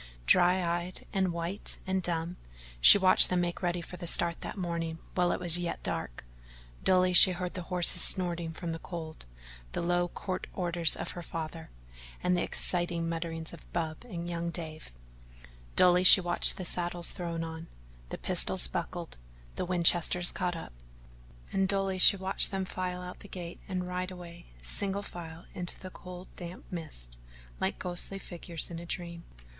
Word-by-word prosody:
Dry 180 - +4
eyed 175 +2 -4
and 190 -3 +1
white 170 +4 -4
and 190 -1 -1
dumb, 170 0 -2 0.4
she 130 - +11
watched 185 -1 +5
them 180 -1 +1
make 175 +1 -3
ready 175 -1 -1
for 180 +2 -10
the 175 -1 -7
start 170 0 +4
that - - -7
morning 170 -3 -3 0.2
while 180 -1 +1
it - - -2
was 175 -1 +4
yet 175 -1 -4
dark; - - -4 0.6
dully 185 -1 +3
she 185 +1 +8
heard 180 0 -5
the 180 - -5
horses 180 -1 +2
snorting 175 -3 +3
from 165 +1 -6
the 165 - -5
cold, 160 - -8 0.5
the - - -2
low 175 0 +1
curt 185 +1 -5
orders 170 -3 +1
of - - -5
her 175 - -7
father, 165 -1 -7 0.5
and 180 0 +2
the 175 - 0
exciting 175 -2 0
mutterings 165 -1 -5
of 170 - -14
Bub 160 +2 -3
and 175 -7 -6
young 170 0 -3
Dave; 160 - -7 0.8
dully 180 0 +5
she 185 - +12
watched 175 -1 +2
the 185 - -6
saddles 175 0 -2
thrown 170 -2 -4
on, 160 0 -7 0.4
the - - -5
pistols - - +3
buckled, - - -5 0.4
the - - -3
Winchesters 175 0 +3
caught 175 -1 -2
up, 165 - -9 0.8
and 195 0 +1
dully 195 -1 0
she 200 - +7
watched 190 0 0
them 190 -1 -3
file 180 -1 -4
out 180 0 -9
the - - -10
gate 175 -3 -7
and 185 -2 -3
ride 180 0 -3
away, 175 - -11 0.2
single 200 - +1
file, 165 -3 -9
into 175 -1 -2
the 185 - -9
cold, 180 0 -10
damp 175 0 -8
mist - - -5 0.4
like - - -1
ghostly 180 +2 -1
figures 175 -3 -5
in 165 - -6
a 170 - -9
dream. 170 -1 -6
175 Hz, 170 wpm, -29 LUFS, 170-180 Hz, 0.8 s, she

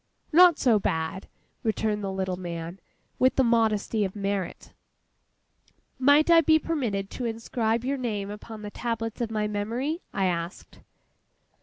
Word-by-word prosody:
'Not 345 -1 +7
so 230 -5 +3
bad,' 160 +1 -2 0.3
returned 215 -1 -1
the 195 - -2
little 190 -1 -2
man, 170 0 -6 0.4
with 255 -1 +4
the 265 - +4
modesty 225 -2 +2
of 190 0 -3
merit. 200 -2 -3 1.3
'Might 285 +5 +5
I 335 -1 +8
be 315 0 +5
permitted 235 -12 -2
to 250 - -4
inscribe 230 0 -1
your 275 +1 0
name 205 -5 -3
upon 210 +1 -9
the 205 - -6
tablets 225 0 -3
of 235 - -1
my 215 -1 -1
memory?' 235 - -2
I 195 - 0
asked. 170 0 -4
220 Hz, 145 wpm, -26 LUFS, 195-250 Hz, 1.3 s, I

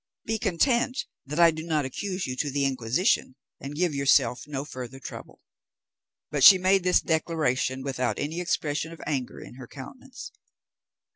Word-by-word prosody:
Be 225 0 -2
content 240 +5 +1 0.2
that 150 +4 -4
I 170 -1 +7
do 160 0 -6
not 155 -3 -1
accuse 185 +7 -4
you 130 - -4
to 145 - -1
the 140 0 0
Inquisition, 130 - 0 0.2
and 140 +2 -7
give 175 0 0
yourself 140 -2 +2
no 140 -1 -4
further 130 -2 -8
trouble." - - -10 0.9
But 145 -3 0
she 190 - +11
made 190 +1 +3
this 180 0 +3
declaration 155 -5 -1
without 125 -5 -2
any 155 +4 -3
expression 160 -2 -2
of 165 - -12
anger 135 -4 -3
in 125 - -12
her 130 -2 -10
countenance. 250 - -10
150 Hz, 160 wpm, -26 LUFS, 130-180 Hz, 0.9 s, she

